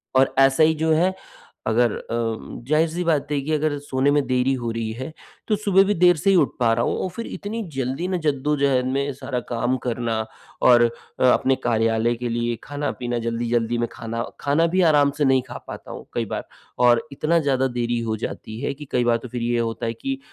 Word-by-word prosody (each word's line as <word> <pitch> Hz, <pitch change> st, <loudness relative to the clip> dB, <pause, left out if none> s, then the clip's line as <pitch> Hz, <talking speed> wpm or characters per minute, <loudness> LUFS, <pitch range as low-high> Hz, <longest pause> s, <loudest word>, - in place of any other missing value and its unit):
और 130 Hz, 0 st, +4 dB
ऐसा 135 Hz, +2 st, +5 dB
ही 160 Hz, +1 st, +5 dB
जो 160 Hz, +1 st, 0 dB
है, 180 Hz, +4 st, +2 dB, 0.5 s
अगर 115 Hz, +1 st, +3 dB
अम, 115 Hz, -1 st, -4 dB
ज़ाहिर 155 Hz, +3 st, +3 dB
सी 175 Hz, +3 st, -3 dB
बात 155 Hz, -4 st, +1 dB
है 145 Hz, -, +1 dB
कि 145 Hz, +3 st, -4 dB
अगर 150 Hz, -1 st, 0 dB
सोने 140 Hz, 0 st, 0 dB
में 145 Hz, -1 st, +2 dB
देरी 130 Hz, +1 st, +2 dB
हो 120 Hz, -, -2 dB
रही 115 Hz, -1 st, -3 dB
है, 130 Hz, +5 st, -5 dB, 0.4 s
तो 215 Hz, -, +2 dB
सुबह 200 Hz, -2 st, +4 dB
भी 205 Hz, -, +2 dB
देर 175 Hz, 0 st, +5 dB
से 185 Hz, +6 st, +1 dB
ही 195 Hz, -, +5 dB
उठ 155 Hz, -6 st, +3 dB
पा 115 Hz, -2 st, +3 dB
रहा 115 Hz, +1 st, +1 dB
हूँ -, -, 0 dB
और 185 Hz, -, -2 dB
फिर 230 Hz, -, -5 dB
इतनी 220 Hz, +3 st, -5 dB
जल्दी 135 Hz, +6 st, -2 dB
ना, 185 Hz, -1 st, 0 dB
जद्दोजहद 140 Hz, -4 st, +1 dB
में 140 Hz, +2 st, -1 dB
सारा 130 Hz, -1 st, -4 dB
काम 120 Hz, +2 st, 0 dB
करना 120 Hz, -2 st, -1 dB, 0.5 s
और 120 Hz, -1 st, +7 dB, 0.4 s
अ, -, -, +1 dB
अपने 130 Hz, +1 st, +4 dB
कार्यालय 115 Hz, 0 st, +2 dB
के 120 Hz, +1 st, -4 dB
लिए 120 Hz, 0 st, -1 dB
खाना-पीना, 130 Hz, -4 st, -3 dB
जल्दी-जल्दी 115 Hz, 0 st, 0 dB
में 120 Hz, 0 st, 0 dB
खाना 115 Hz, 0 st, -4 dB, 0.2 s
खाना 150 Hz, +4 st, +2 dB
भी 185 Hz, -, +4 dB
आराम 145 Hz, -1 st, +4 dB
से 150 Hz, -, +2 dB
नहीं 130 Hz, -1 st, +4 dB
खा -, -, -6 dB
पाता -, -, -8 dB
हूँ -, -, -8 dB
कई -, -, -1 dB
बार -, -, -6 dB, 0.4 s
और 120 Hz, +3 st, +3 dB
इतना 155 Hz, +4 st, +1 dB
ज़्यादा 135 Hz, -3 st, +1 dB
देरी 120 Hz, 0 st, 0 dB
हो 110 Hz, -, -1 dB
जाती 110 Hz, +1 st, -7 dB
है -, -, -1 dB
कि 150 Hz, +2 st, -10 dB
कई 125 Hz, -, +2 dB
बार 120 Hz, -1 st, +3 dB
तो -, -, -6 dB
फिर 120 Hz, +1 st, -4 dB
ये 120 Hz, 0 st, 0 dB
होता 115 Hz, 0 st, -2 dB
है 115 Hz, -, -1 dB
कि 270 Hz, -, -4 dB
130 Hz, 220 wpm, -23 LUFS, 120-155 Hz, 0.5 s, और